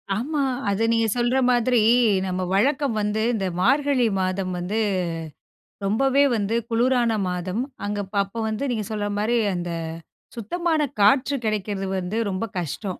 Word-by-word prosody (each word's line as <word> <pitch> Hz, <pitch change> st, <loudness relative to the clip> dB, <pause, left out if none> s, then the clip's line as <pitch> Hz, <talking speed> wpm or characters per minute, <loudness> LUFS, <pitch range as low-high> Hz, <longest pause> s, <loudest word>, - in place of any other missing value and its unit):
ஆமா, 285 Hz, +6 st, -1 dB, 0.3 s
அத 200 Hz, +3 st, 0 dB
நீங்க 225 Hz, -1 st, +2 dB
சொல்ற 240 Hz, +2 st, +1 dB
மாதிரி, 245 Hz, 0 st, +3 dB, 0.5 s
நம்ம 185 Hz, 0 st, -2 dB
வழக்கம் 275 Hz, +4 st, +2 dB
வந்து 210 Hz, +1 st, -1 dB
இந்த 195 Hz, -4 st, -1 dB
மார்கழி 275 Hz, +1 st, +3 dB
மாதம் 185 Hz, 0 st, -1 dB
வந்து, 195 Hz, +5 st, -2 dB, 1.1 s
ரொம்பவே 270 Hz, +7 st, +3 dB
வந்து 215 Hz, +1 st, -1 dB
குளுரான 235 Hz, -1 st, +2 dB
மாதம். 180 Hz, +5 st, -2 dB, 0.2 s
அங்க 205 Hz, 0 st, -2 dB
அப்ப 200 Hz, +2 st, -13 dB
அப்போ 200 Hz, +4 st, -8 dB
வந்து 260 Hz, +5 st, -2 dB
நீங்க 215 Hz, -3 st, -2 dB
சொல்ற 205 Hz, -1 st, -2 dB
மாரி 230 Hz, +3 st, +1 dB, 0.2 s
அந்த 175 Hz, 0 st, -3 dB, 0.6 s
சுத்தமான 320 Hz, -, -1 dB, 0.2 s
காற்று 265 Hz, +7 st, +4 dB
கிடைக்கிறது 205 Hz, -2 st, -2 dB
வந்து 190 Hz, +5 st, -3 dB
ரொம்ப 190 Hz, +5 st, -2 dB
கஷ்டம். 165 Hz, +5 st, -5 dB
220 Hz, 140 wpm, -23 LUFS, 195-250 Hz, 1.1 s, காற்று